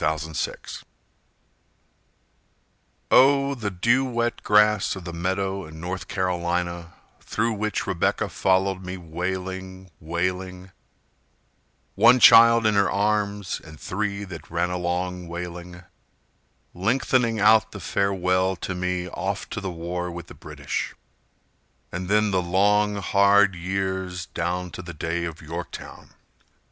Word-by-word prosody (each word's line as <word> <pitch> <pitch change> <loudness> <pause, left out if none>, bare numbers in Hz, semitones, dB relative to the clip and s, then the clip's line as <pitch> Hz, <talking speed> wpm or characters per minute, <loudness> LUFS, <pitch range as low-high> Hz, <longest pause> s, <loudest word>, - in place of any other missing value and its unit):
John 75 - +2
Wasson 80 0 -5 2.3
Oh! 140 +1 +5
the 115 -6 -3
dew 120 +8 +2
wet 120 -2 -2
grass 105 -1 +3
of 95 - -8
the 85 - -6
meadow 95 +3 -2
in 80 +1 -11
North 90 +3 -5
Carolina 85 -2 -2 0.3
Through 115 0 -1
which 110 0 -2
Rebecca - - 0
followed 95 0 +1
me 90 +1 -5
wailing, 95 +2 -5
wailing, 90 +3 -3 1.2
One 125 - +6
child 115 0 +8
in 110 - +4
her 100 -1 +3
arms, 105 -1 -1
and 80 -2 -13
three 100 +1 -3
that 90 -5 -9
ran 85 +2 -1
along 90 0 -2
wailing, 90 +1 -7 0.9
Lengthening 115 +3 +1
out 110 +1 +5
the - - -8
farewell 95 -1 0
to 95 - -5
me 90 0 -2
off 95 +2 -4
to 105 - -4
the 95 - -3
war 90 +1 -4
with 85 -1 -7
the - - -13
British, - - -5 1.0
And 90 +1 -4
then 105 0 +3
the 95 -1 +2
long, 105 +4 +2
hard 100 0 +4
years 95 0 -3
down 90 +1 -3
to - - -7
the 85 -2 -9
day 85 +2 -2
of 80 -2 -7
Yorktown. 85 +3 -8
95 Hz, 125 wpm, -24 LUFS, 90-100 Hz, 2.3 s, child